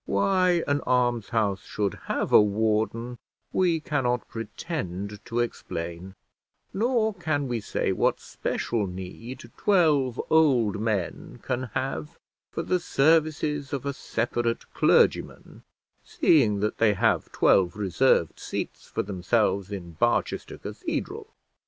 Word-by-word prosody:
Why 180 - +2
an 145 0 +2
almshouse 115 -5 +1
should 100 -3 -2
have - - -2
a - - +9
warden 110 +3 0 0.3
we 175 -3 +2
cannot 130 -5 -1
pretend 105 - -5
to 120 0 -1
explain, 85 -4 -5 0.6
nor 220 0 +1
can 155 -6 -1
we 120 -2 -1
say 105 - -1
what - - +1
special 110 -4 -2
need 115 +7 -8
twelve 150 - +3
old 130 -11 +4
men 100 -7 -3
can 125 0 -2
have 80 - -3 0.3
for - - -4
the 180 - +1
services 150 -2 +1
of 140 -1 -3
a 140 - -1
separate 120 -2 -2
clergyman, - - +2 0.4
seeing 110 -10 +3
that 105 - -1
they 110 -2 +4
have - - +1
twelve 90 -3 +3
reserved 100 - +2
seats - - -5
for - - -2
themselves 100 +1 0
in 90 -4 -6
Barchester 80 - 0
Cathedral. - - -5
120 Hz, 120 wpm, -26 LUFS, 100-145 Hz, 0.6 s, a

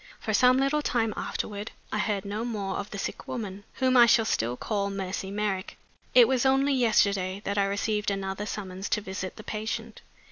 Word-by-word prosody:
For - - -2
some 255 0 +5
little 275 +3 +2
time 225 -6 0
afterward 205 0 -4 0.2
I 215 - -1
heard 205 -2 -1
no 210 +3 -3
more 210 -5 -3
of 205 - -5
the 200 - -6
sick - - -5
woman, 205 -4 -5
whom 260 -1 +1
I 240 -1 +8
shall 225 -1 +5
still 120 - 0
call 200 -2 -1
Mercy 190 -1 -4
Merrick. 200 -2 -2 0.4
It 245 -2 +9
was 255 -2 +2
only 270 +1 +3
yesterday 200 -6 +2
that 200 +1 0
I 200 - +3
received 210 +1 0
another 195 +1 -3
summons 190 -2 -5
to 215 - +1
visit 190 -1 -5
the 215 - -10
patient. 220 +1 -4
210 Hz, 190 wpm, -27 LUFS, 195-235 Hz, 0.4 s, It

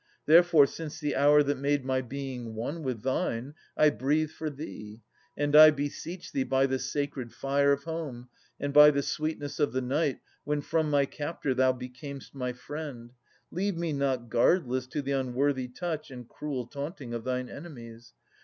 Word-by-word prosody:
Therefore, 165 -2 +7
since 155 +1 -7
the 150 -2 -1
hour 145 +1 +6
that 145 -1 -1
made 140 -1 0
My 130 0 +1
being 125 -3 -6
one 140 +9 -4
with 125 -7 -4
thine, 130 0 -1 0.2
I 155 -1 +5
breathe 150 +3 0
for 155 - -4
thee; 115 -7 -9 0.3
And 145 0 +1
I 155 0 +11
beseech 155 +4 -4
thee 135 - -1
by 135 +1 +2
the 130 -1 -1
sacred 140 -5 -3
fire 140 +3 +1
Of 140 0 0
home, 155 -7 -5 0.3
and 145 0 -3
by 150 0 +10
the 140 -1 0
sweetness 155 -1 -3
of 145 -5 +1
the 130 - 0
night 140 +3 0 0.3
When 150 0 -1
from 160 +1 0
my 140 -1 +3
captor 145 -1 -3
thou 130 0 +3
becam'st 125 +2 -9
my 125 -2 -3
friend, 125 -2 -8 0.4
Leave 195 +1 -1
me 170 -2 -1
not 135 -4 -1
guardless 130 +1 +2
to 145 +2 -3
the 140 - -3
unworthy 130 0 0
touch 155 +3 -4
And 125 -3 -9
cruel 135 -4 -4
taunting 140 -1 -6
of 115 -1 -4
thine 125 0 -2
enemies 120 -8 -11
140 Hz, 175 wpm, -29 LUFS, 125-150 Hz, 0.4 s, I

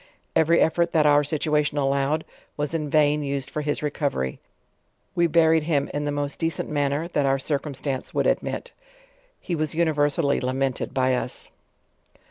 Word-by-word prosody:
Eve 160 - +3
ry 170 - +5
'effort 170 +1 +2
that 155 -2 +4
our 145 0 +6
eituaticn 150 0 0
allowed, 140 +2 +1 0.3
was 145 +1 -2
in 155 -3 -2
vaii 150 -1 +3
used 140 -1 -3
for 150 - -2
his 145 0 -2
recovery; 140 - -2 0.7
we 170 -1 +3
buried 160 0 +4
him 150 -3 0
in 145 0 -2
the 145 - -1
most 145 -1 -3
decent 165 -1 -1
manner 145 +2 -1
that 145 -5 +1
our 135 0 +3
circumstance 140 -1 -3
would - - 0
admit. - - -1 0.7
He 175 - -3
was 155 0 -1
universally 145 -3 +1
lamented 130 0 -1
by 130 -1 +1
us. 125 - -4
145 Hz, 160 wpm, -24 LUFS, 140-155 Hz, 0.7 s, our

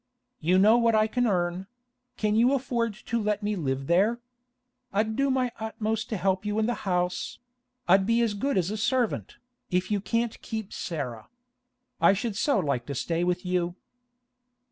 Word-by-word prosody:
You 180 +4 +3
know 215 +5 +6
what 230 -1 +3
I 215 0 +4
can 245 +2 0
earn; 180 -1 -1 0.5
can 210 -1 +1
you 240 +4 +4
afford 235 -4 -1
to 235 0 -1
let 210 0 -1
me 210 0 0
live 135 -6 -2
there? 200 - +3 0.7
I'd 215 +2 0
do 275 +2 +2
my 255 -2 +1
utmost 220 0 -2
to 220 - -2
help 190 0 0
you 210 0 -2
in 220 - +2
the 240 - +1 0.2
house; 180 0 -1 0.5
I'll 185 +2 +7
be 230 +4 +2
as 225 -3 0
good 270 +4 -1
as 185 +1 +1
a 215 - -3
servant, 245 +1 0 0.3
if 180 +3 0
you 205 -2 +1
can't 230 +2 -1
keep 220 -3 -5
Sarah. 125 -9 -5 0.7
I - - +6
should 215 +1 -2
so 280 +6 +2
like 140 -9 -1
to 140 - -4
stay 165 +6 -1
with 180 +1 -1
you! 180 -1 0
210 Hz, 180 wpm, -27 LUFS, 180-230 Hz, 0.7 s, I'll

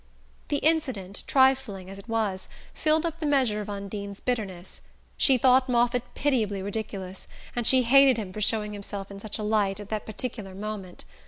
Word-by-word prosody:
The 290 - 0
incident, 260 - 0
trifling 260 -8 +3
as 195 +1 -8
it 210 - -14
was, 210 -4 -1 0.2
filled 315 +1 +2
up 330 0 -3
the 315 - -3
measure 255 -7 +2
of 210 - -7
Undine's 200 0 -6
bitterness. 200 -8 -4 0.3
She 265 -2 +4
thought 255 +1 +4
Moffatt 245 0 +1
pitiably 220 -9 0
ridiculous, 195 -2 -5 0.3
and 240 -2 0
she 260 -1 +6
hated 265 +1 +6
him 195 -4 -5
for 215 - -5
showing 210 0 +1
himself 200 -1 -6
in 200 - -8
such 215 0 -4
a 215 - -4
light 210 -2 +1
at 205 -1 -9
that 215 -1 -3
particular 215 -3 -5
moment. 200 -3 -6
215 Hz, 175 wpm, -27 LUFS, 200-255 Hz, 0.3 s, she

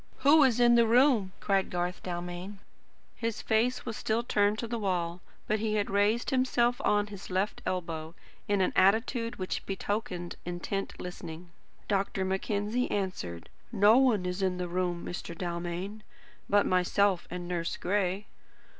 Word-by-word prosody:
"WHO 290 +4 +7
is 245 -2 +2
in 240 0 +6
the 235 -1 +5
room?" 235 -5 +4
cried 195 -2 +1
Garth 180 0 -2
Dalmain. 175 +2 -5 0.6
His 230 -2 -3
face 235 +3 +1
was 230 -2 -4
still 225 +3 0
turned 205 -2 +2
to 235 - -3
the 235 0 -3
wall; 180 -3 -1 0.2
but 215 0 0
he 215 0 0
had 205 -1 0
raised 210 +6 +2
himself 245 -2 +2
on 205 0 +3
his 200 -2 -10
left 190 +3 -1
elbow, 165 -3 -3 0.3
in 205 -2 +2
an 185 - +1
attitude 230 +4 +2
which 185 -1 -3
betokened 195 -2 -3
intent 175 +3 -4
listening. 175 -1 -8 0.4
Dr. 195 -1 0
Mackenzie 205 +5 -1
answered. 180 - -3 0.2
"No 210 +1 +6
one 230 -8 +3
is 180 +2 -3
in 185 -1 +1
the 180 0 -2
room, 175 0 -2
Mr. 170 -1 -6
Dalmain, 175 +4 -4 0.5
but 205 0 +4
myself 185 +1 +2
and 175 0 -5
Nurse 170 -1 -2
Gray." 195 +1 0
195 Hz, 155 wpm, -29 LUFS, 180-220 Hz, 0.6 s, WHO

